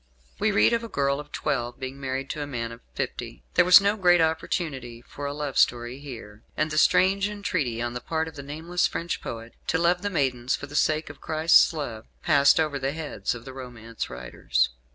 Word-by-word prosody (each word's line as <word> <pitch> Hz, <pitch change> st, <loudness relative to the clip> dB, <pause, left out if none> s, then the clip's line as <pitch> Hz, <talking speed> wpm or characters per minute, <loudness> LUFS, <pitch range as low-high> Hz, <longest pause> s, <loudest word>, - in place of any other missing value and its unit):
We -, -, +2 dB
read 105 Hz, -, +4 dB
of 235 Hz, 0 st, +1 dB
a -, -, -5 dB
girl 140 Hz, -3 st, 0 dB
of 150 Hz, 0 st, -10 dB
twelve 120 Hz, -2 st, -2 dB
being 135 Hz, +1 st, -6 dB
married 135 Hz, 0 st, -3 dB
to 150 Hz, -, -5 dB
a 145 Hz, -, -3 dB
man 115 Hz, -4 st, -4 dB
of 115 Hz, +1 st, -11 dB
fifty. -, -, -5 dB
There 180 Hz, -, +5 dB
was 180 Hz, +2 st, +9 dB
no 200 Hz, +1 st, +2 dB
great 175 Hz, -4 st, +4 dB
opportunity 150 Hz, -7 st, -1 dB
for 145 Hz, +3 st, -7 dB
a -, -, -2 dB
love 145 Hz, -2 st, -2 dB
story 120 Hz, +2 st, +2 dB
here; 115 Hz, -7 st, -10 dB, 0.2 s
and 155 Hz, 0 st, 0 dB
the 155 Hz, -, +2 dB
strange 195 Hz, +4 st, +4 dB
entreaty, 155 Hz, -, -2 dB
on 120 Hz, 0 st, -3 dB
the 125 Hz, -, -5 dB
part 160 Hz, +4 st, -2 dB
of 160 Hz, -, -9 dB
the 140 Hz, -, -7 dB
nameless 160 Hz, +5 st, -1 dB
French 170 Hz, 0 st, -4 dB
poet, 115 Hz, 0 st, -7 dB
to -, -, +2 dB
love 175 Hz, +2 st, +2 dB
the 205 Hz, -, -1 dB
maidens 130 Hz, -7 st, 0 dB
for -, -, -7 dB
the 145 Hz, +1 st, -11 dB
sake 155 Hz, +1 st, +1 dB
of -, -, -18 dB
Christ's 160 Hz, +1 st, +5 dB
love, 120 Hz, -9 st, -5 dB, 0.2 s
passed 140 Hz, -2 st, +5 dB
over 150 Hz, -3 st, 0 dB
the 135 Hz, +1 st, -1 dB
heads 145 Hz, -9 st, -3 dB
of 115 Hz, -, -10 dB
the 130 Hz, -, -8 dB
romance 120 Hz, -3 st, -7 dB
writers. -, -, -1 dB
140 Hz, 215 wpm, -26 LUFS, 120-160 Hz, 0.2 s, was